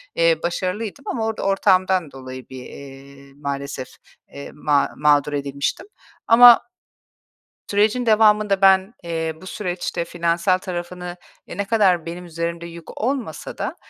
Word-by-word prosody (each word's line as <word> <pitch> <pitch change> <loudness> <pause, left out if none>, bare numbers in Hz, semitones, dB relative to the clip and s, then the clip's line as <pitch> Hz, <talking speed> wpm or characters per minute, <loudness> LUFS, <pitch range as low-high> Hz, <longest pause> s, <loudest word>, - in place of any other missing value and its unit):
Eee, 165 -1 +3
başarılıydım 195 +9 -3
ama 225 -2 -2
orada 225 -1 -3
ortağımdan 185 -4 +2
dolayı 130 -1 -10
bir, 130 -1 -9
eee, 140 0 -13
maalesef, 140 -2 -5 0.5
eee, 140 - -9
ma 145 -1 +1
mağdur 150 0 +3
edilmiştim. 140 - -3 0.4
Ama 240 +1 +9 1.1
sürecin 215 +4 +2
devamında 210 -2 +3
ben, 190 +3 +4
eee, 160 -1 -2
bu 185 - -12
süreçte 180 -3 -3
finansal 170 +2 0
tarafını, 180 -1 -6 0.3
e, - - -9
ne 200 - -1
kadar 195 -6 +2
benim 175 +2 -6
üzerimde 170 0 -4
yük 170 -1 -11
olmasa 255 0 -3
da - - -3
175 Hz, 130 wpm, -21 LUFS, 150-200 Hz, 1.1 s, Ama